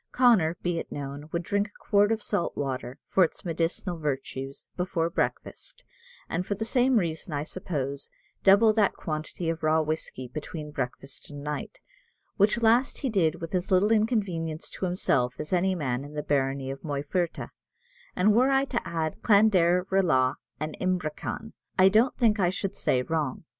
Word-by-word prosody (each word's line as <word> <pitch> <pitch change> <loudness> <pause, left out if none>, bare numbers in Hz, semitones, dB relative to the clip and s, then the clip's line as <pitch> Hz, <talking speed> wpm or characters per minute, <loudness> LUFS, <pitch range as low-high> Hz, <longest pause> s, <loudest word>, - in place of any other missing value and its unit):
Connor, 205 -10 +4
be 175 -1 0
it - - -7
known, 145 +1 -6
would 170 0 -2
drink 205 +3 0
a 205 - -22
quart 205 +1 +3
of 225 -1 0
salt 170 - -1
water, 130 -2 -3
for 190 - +4
its 165 - -3
medicinal 170 +1 -2
virtues, 135 -2 -4
before 170 -2 -1
breakfast; - - -3 0.4
and 170 +2 -1
for 205 - -2
the 220 +3 -3
same 250 +1 +3
reason, 165 -3 -2
I 145 0 -1
suppose, 140 -5 -4 0.3
double 205 +3 +6
that 210 -2 +3
quantity 155 +2 -4
of 165 0 -1
raw 155 0 +3
whiskey 150 -4 -4
between 150 +3 -6
breakfast 135 0 -5
and 145 -1 -8
night, 150 - -4 0.6
which 215 +3 +2
last 235 +4 +3
he 265 - -1
did 170 -7 +1
with 165 +1 -6
as 180 -1 -1
little 195 +3 +4
inconvenience 195 -8 0
to - - -3
himself 130 -9 +1
as 150 - -4
any 185 +1 +2
man 130 -6 -2
in 145 +1 -10
the 150 - -2
barony 135 -1 0
of 135 - -7
Moyferta; 150 +4 -2 0.6
and 205 +3 +4
were 250 +5 +4
I 270 0 +3
to 245 -3 -2
add 160 -2 -3
Clanderalaw 180 - +4 0.3
and 155 0 -4
Ibrickan, 185 +4 -2 0.2
I 190 +1 +7
don't 225 +6 +3
think 220 -4 +3
I 180 -2 +3
should 190 +1 -3
say 125 -1 +1
wrong. 155 -2 -2
170 Hz, 170 wpm, -27 LUFS, 150-205 Hz, 0.6 s, I